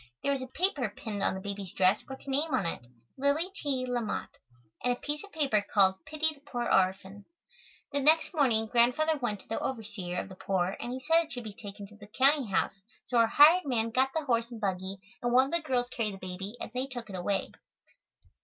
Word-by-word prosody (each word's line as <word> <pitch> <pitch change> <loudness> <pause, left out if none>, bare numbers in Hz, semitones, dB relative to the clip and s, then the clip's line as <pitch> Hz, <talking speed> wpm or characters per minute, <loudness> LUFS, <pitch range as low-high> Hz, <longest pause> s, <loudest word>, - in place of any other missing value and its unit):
There 280 - +2
was 275 -2 -1
a 260 - -5
paper 290 - 0
pinned 205 0 -6
on 190 - +1
the - - -4
baby's 200 -1 -6
dress 190 +2 +3
with 265 - -8
her 275 - -4
name 290 +1 +1
on 220 - 0
it, 120 -7 -4 0.3
"Lily 290 +7 +2
T. 275 -8 -1
LaMott," 240 -3 -2 0.5
and 245 - +3
a 245 - -9
piece 295 +3 -3
of 405 - -13
poetry 275 -9 +2
called 190 +1 +4
"Pity 315 0 +1
the 290 - -20
Poor 275 -4 -4
Orphan." 190 +2 +1 0.7
The 285 - 0
next 310 +5 +4
morning, 245 -8 +3
Grandfather 250 +7 +2
went 215 -6 -2
to - - -23
the 225 - -2
overseer 205 -7 -4
of - - -5
the - - -9
poor 185 0 -1
and 240 - -4
he 255 - -4
said 330 +4 +3
it 320 - -17
should 245 - -5
be 215 -2 -7
taken 200 0 -9
to 210 +2 -15
the 205 -1 -13
county 270 +4 +3
house, 195 0 -1 0.2
so 245 - +1
our 230 - +5
hired 315 +8 +7
man 230 -4 0
got 260 +3 +3
the 320 -2 -1
horse 235 -3 +1
and 235 -2 -8
buggy, 190 -1 -2 0.2
and 240 - 0
one 260 +1 +6
of 275 - -7
the 340 0 +2
girls 255 -5 0
carried 220 -5 -2
the - - -10
baby 190 +3 -6
and - - -6
they 255 +2 -2
took 240 -4 -7
it 195 - -7
away. 190 +2 -1
240 Hz, 230 wpm, -30 LUFS, 200-280 Hz, 0.7 s, hired